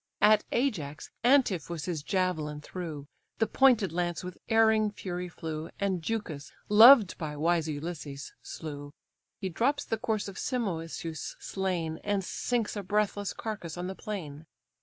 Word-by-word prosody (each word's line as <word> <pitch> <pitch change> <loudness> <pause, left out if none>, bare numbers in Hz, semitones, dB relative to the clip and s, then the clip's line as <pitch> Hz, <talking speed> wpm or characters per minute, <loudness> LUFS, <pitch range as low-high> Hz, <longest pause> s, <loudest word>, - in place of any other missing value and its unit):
At 210 0 +6
Ajax, 175 - -1
Antiphus 190 - +2
his 170 -5 -2
javelin 160 -4 -1
threw; 155 -4 -6 0.3
The 225 - +3
pointed 235 -5 +4
lance 175 +1 -1
with 180 0 -7
erring 220 -1 +4
fury 180 -3 -5
flew, 160 -2 -5
And 190 -3 0
Leucus, 160 -7 -4 0.2
loved 220 -1 +9
by 150 -2 -4
wise 165 +1 +2
Ulysses, 145 -2 -5
slew. 145 -2 -7 0.4
He 190 - -3
drops 265 - +1
the 225 - -2
corpse 220 -3 -1
of 195 - -7
Simoisius 165 - -3
slain, 175 -5 -2
And 205 -1 0
sinks 235 +4 -1
a 205 - -2
breathless 205 0 0
carcase 210 -7 -5
on 175 - -3
the 190 - -3
plain. 165 -8 -6
180 Hz, 140 wpm, -29 LUFS, 160-215 Hz, 0.4 s, loved